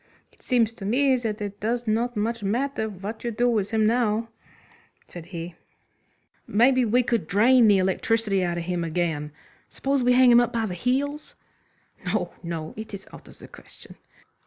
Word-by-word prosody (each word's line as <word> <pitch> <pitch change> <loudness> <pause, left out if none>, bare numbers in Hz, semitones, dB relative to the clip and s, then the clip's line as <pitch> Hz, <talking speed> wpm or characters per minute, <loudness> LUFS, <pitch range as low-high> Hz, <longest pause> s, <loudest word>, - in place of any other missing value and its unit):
"It - - -28
seems 230 -3 +1
to 225 - -11
me 260 +6 +2
that 225 -3 -3
it 205 0 -6
does 235 +2 -2
not 230 +2 0
much 230 +2 -1
matter 220 +3 -1
what 205 +3 -7
you 240 - -1
do 235 +2 0
with 215 -5 0
him 220 -1 +1
now," 225 -1 +1 0.8
said 175 -1 -10
he. 170 -1 -7 0.9
"Maybe 255 +4 +3
we 245 +2 +2
could 230 -8 -1
drain 230 +5 +5
the 205 -2 +5
electricity 195 +1 0
out 175 -1 -1
of 170 - -3
him 175 0 -2
again. 160 -3 -2 0.4
Suppose 275 0 -1
we 250 0 +3
hang 250 0 +6
him 240 - +7
up 240 -1 +1
by 230 -2 -1
the 190 - -4
heels?" 275 - -2 0.7
"No, 180 -1 -2
no, 165 -2 -5
it's 215 -2 -8
out - - -13
of - - -15
the - - -13
question." - - -14
220 Hz, 180 wpm, -25 LUFS, 190-245 Hz, 0.9 s, him